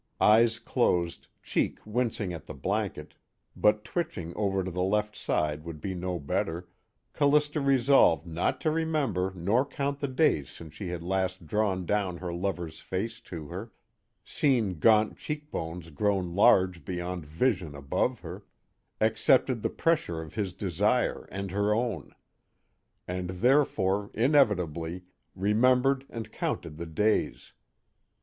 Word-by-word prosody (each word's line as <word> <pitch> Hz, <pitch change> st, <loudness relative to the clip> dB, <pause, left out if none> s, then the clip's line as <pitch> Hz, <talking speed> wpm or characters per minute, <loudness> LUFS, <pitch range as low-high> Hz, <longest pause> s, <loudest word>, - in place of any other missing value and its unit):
_ -, -, -51 dB, 0.2 s
Eyes 115 Hz, +2 st, +5 dB
closed, 90 Hz, -9 st, 0 dB, 0.2 s
cheek -, -, 0 dB
wincing 110 Hz, -4 st, -1 dB
at 85 Hz, -, -8 dB
the 80 Hz, -, -7 dB
blanket 100 Hz, +8 st, -3 dB, 0.4 s
but 105 Hz, 0 st, +3 dB
twitching 155 Hz, -, -4 dB
over 95 Hz, -2 st, 0 dB
to 95 Hz, -, -4 dB
the 90 Hz, +1 st, -2 dB
left 105 Hz, +3 st, 0 dB
side 75 Hz, 0 st, -1 dB
would 85 Hz, -2 st, -7 dB
be 95 Hz, +4 st, -4 dB
no 90 Hz, 0 st, -3 dB
better 80 Hz, +3 st, -2 dB, 0.5 s
Callista 150 Hz, +1 st, +2 dB
resolved 135 Hz, -, +4 dB
not 85 Hz, +1 st, -1 dB
to 155 Hz, -, +1 dB
remember 150 Hz, -, 0 dB
nor 100 Hz, +9 st, +2 dB
count 140 Hz, 0 st, -3 dB
the 140 Hz, -, -1 dB
days 130 Hz, -, +2 dB
since 80 Hz, -3 st, -11 dB
she 90 Hz, +4 st, -6 dB
had 85 Hz, -1 st, -4 dB
last 95 Hz, -1 st, -1 dB
drawn 95 Hz, 0 st, 0 dB
down 95 Hz, -2 st, 0 dB
her 90 Hz, -1 st, -5 dB
lover's 85 Hz, -3 st, -3 dB
face 110 Hz, +5 st, -4 dB
to 80 Hz, -8 st, -8 dB
her, 95 Hz, +6 st, -7 dB, 0.5 s
seen 115 Hz, -, +1 dB
gaunt 110 Hz, +5 st, +4 dB
cheekbones 90 Hz, -, -5 dB
grown 95 Hz, 0 st, 0 dB
large 95 Hz, -4 st, +4 dB
beyond 90 Hz, -1 st, -4 dB
vision 85 Hz, -, -1 dB
above 70 Hz, -1 st, -1 dB
her, -, -, -8 dB, 0.6 s
accepted 115 Hz, +2 st, +3 dB
the -, -, 0 dB
pressure 155 Hz, -, 0 dB
of 80 Hz, -1 st, -8 dB
his 100 Hz, -4 st, -3 dB
desire 100 Hz, +6 st, 0 dB
and 100 Hz, 0 st, -4 dB
her 100 Hz, +2 st, +1 dB
own. 120 Hz, +1 st, -3 dB, 0.9 s
And 90 Hz, 0 st, -3 dB
therefore, 100 Hz, -2 st, +2 dB
inevitably, 95 Hz, -, +2 dB, 0.3 s
remembered 125 Hz, +7 st, +3 dB
and 115 Hz, -1 st, -7 dB
counted 75 Hz, -, -3 dB
the 85 Hz, -, -5 dB
days. 105 Hz, +7 st, 0 dB
100 Hz, 140 wpm, -28 LUFS, 85-120 Hz, 0.9 s, Eyes